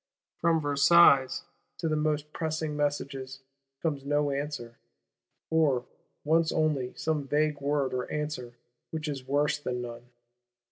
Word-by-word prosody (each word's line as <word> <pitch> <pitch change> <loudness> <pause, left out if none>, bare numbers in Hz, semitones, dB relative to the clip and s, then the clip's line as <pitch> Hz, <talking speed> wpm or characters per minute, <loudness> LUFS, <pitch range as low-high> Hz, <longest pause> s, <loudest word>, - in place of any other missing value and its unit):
From 165 -1 +3
Versailles, 145 -2 +5 0.3
to 165 - -2
the 155 - +1
most 150 0 -1
pressing 160 -1 -2
messages, 135 -2 -2 0.4
comes 145 -4 -1
no 145 0 +1
answer; 140 -4 -4 0.7
or 145 -6 +3 0.4
once 160 +1 +3
only 150 -5 0
some 155 -3 -1
vague 150 0 +1
word 140 -2 0
of 125 -1 -2
answer 150 -5 -4 0.3
which 160 -1 -4
is 135 -3 -5
worse 150 +2 +1
than 125 -3 -3
none. 120 0 -9
145 Hz, 130 wpm, -29 LUFS, 135-155 Hz, 0.7 s, Versailles